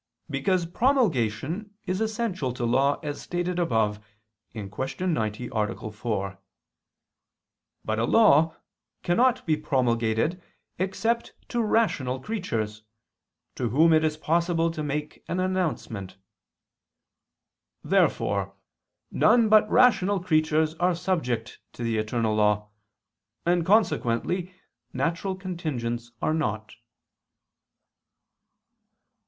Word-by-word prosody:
Because 170 +6 +1
promulgation 180 - 0
is 185 +3 -2
essential 215 - -1
to 125 -1 -3
law, 135 +4 +2
as 145 -1 -4
stated 175 0 -2
above 110 -9 0 0.5
(Q. 105 -4 -6 0.4
90, 120 - -1
A. 110 0 -2
4). 100 -3 -3 1.5
But 110 0 -1
a 115 - +2
law 165 - +5 0.5
cannot 245 +8 +2
be 155 - +2
promulgated 125 +2 0 0.4
except 225 +5 -1 0.2
to 240 - 0
rational 200 - +1
creatures, 115 - -3 0.7
to 120 -3 -2
whom 160 +8 +5
it 155 0 +4
is 155 -1 0
possible 165 +1 +1
to 160 -2 -5
make 150 0 -4
an 180 - -2
announcement. 170 - -2 1.7
Therefore 100 -1 +1 0.6
none 225 0 +4
but 215 0 +5
rational 205 -6 +4
creatures 155 -2 +2
are 180 0 +2
subject 160 -11 -2
to 120 - -7
the 115 -1 0
eternal 110 0 0
law; 105 0 +2 0.8
and 175 0 +2
consequently 180 - +1 0.4
natural 180 +3 -1
contingents 135 -11 -4
are 155 - +2
not. 110 -8 -2
155 Hz, 100 wpm, -26 LUFS, 115-185 Hz, 1.7 s, law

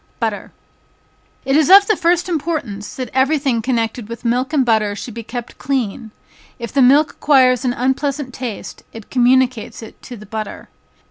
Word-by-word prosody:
Butter. - - -3 0.9
It 270 +1 +1
is 310 +1 +3
of 395 +1 +9
the 430 - +2
first 350 0 +1
importance 290 - -4
that 255 -4 -6
every 265 +4 +2
thing 265 -5 0
connected 230 -2 -2
with 235 +1 -8
milk 250 +4 0
and 280 -5 +2
butter 215 -3 +1
should 235 +3 -7
be 230 - -6
kept 240 +1 -8
clean; 240 -5 -3 0.5
if 235 -3 -7
the 275 - +3
milk 285 +4 +5
acquires 255 -3 +3
an 245 - +1
unpleasant 265 +1 -2
taste, 245 -5 -7
it 225 -2 -11
communicates 250 -2 +1
it 220 - -13
to 245 - -10
the 210 - -12
butter. 215 +1 -7
255 Hz, 175 wpm, -18 LUFS, 230-280 Hz, 0.9 s, of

